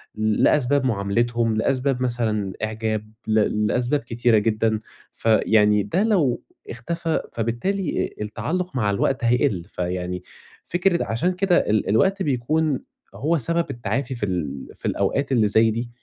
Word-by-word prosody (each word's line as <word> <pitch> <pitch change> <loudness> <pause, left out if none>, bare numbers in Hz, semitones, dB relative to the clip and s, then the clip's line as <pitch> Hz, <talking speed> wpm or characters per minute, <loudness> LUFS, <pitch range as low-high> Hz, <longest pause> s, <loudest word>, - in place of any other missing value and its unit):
لأسباب 125 +6 +2
مُعاملِتهم، 115 +1 0
لأسباب 130 +2 0
مثلًا 110 -5 -1
إعجاب، 110 -1 -2 0.2
ل 105 -1 +2
لأسباب 125 +6 +1
كتيرة 120 -1 +1
جدًا. 110 +1 +1 0.3
فيعني 105 -2 +3
ده 140 - 0
لو 170 - +2 0.3
اختفى، 165 +7 -2
فبالتالي 120 - -1
التعلُق 155 - -3
مع 110 -5 +1
الوقت 120 +6 0
هيقِلّ. 120 -6 +2
فيعني 90 +1 -4 0.4
فكرة 175 0 +1
عشان 125 +12 0
كده 185 -1 +2
ال 105 -2 +1
الوقت 190 - +2
بيكون 145 +2 0 0.4
هو 160 +4 +1
سبب 170 +6 0
التعافي 120 +4 -3
في 115 - -2
ال 75 -8 -3
في - - -11
الأوقات 135 +8 0
اللي 110 -5 +3
زي 110 +2 +4
دي. 115 +2 -3
115 Hz, 130 wpm, -23 LUFS, 105-140 Hz, 0.4 s, زي